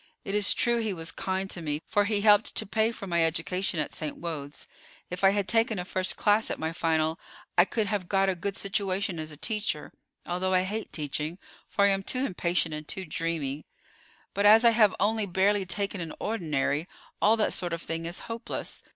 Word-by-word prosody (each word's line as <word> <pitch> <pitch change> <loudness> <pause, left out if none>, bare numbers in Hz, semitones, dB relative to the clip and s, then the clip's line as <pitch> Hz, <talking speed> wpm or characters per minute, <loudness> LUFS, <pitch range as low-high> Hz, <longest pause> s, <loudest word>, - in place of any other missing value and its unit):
It 195 - -4
is 205 -1 +3
true 235 0 +2
he 220 -3 -1
was 165 -1 -4
kind 190 0 -2
to 175 - -3
me, 150 -2 -2
for 205 -2 +2
he 205 -1 0
helped 210 0 +4
to - - +1
pay 220 +3 +1
for 215 - -8
my 170 -3 +2
education 165 +2 0
at 150 - -2
St. 155 -2 -4
Wode's. 150 -4 -6 0.5
If 180 +2 -5
I 195 - +8
had 200 -1 0
taken 225 -1 +3
a 180 - -3
first 185 0 -1
class 210 +1 +3
at - - -2
my 160 0 -2
final 160 -1 0 0.4
I 175 - +6
could 220 +1 -1
have 200 -3 -2
got 195 -1 +3
a 190 - +2
good 190 +3 -4
situation 195 -2 -1
as 155 0 -5
a 150 - -9
teacher, 210 -4 -2 0.3
although 185 +1 0
I 185 - +4
hate 210 +3 -4
teaching, 150 +2 -3 0.3
for 200 - +2
I - - +5
am 195 0 +1
too 255 +7 0
impatient 175 - 0
and 150 0 -6
too 190 -2 -4
dreamy; 155 -3 -3 0.7
but 200 +1 +3
as 220 +3 +7
I 235 - +8
have 220 -3 +4
only 215 +1 +1
barely 195 +2 +2
taken 200 0 -1
an 165 -2 -5
ordinary, 160 -6 -1 0.3
all 220 +2 +5
that 215 - +1
sort 175 -1 +1
of 170 0 -4
thing 165 0 -4
is 175 - -3
hopeless. 230 0 -5
190 Hz, 210 wpm, -28 LUFS, 165-205 Hz, 0.7 s, I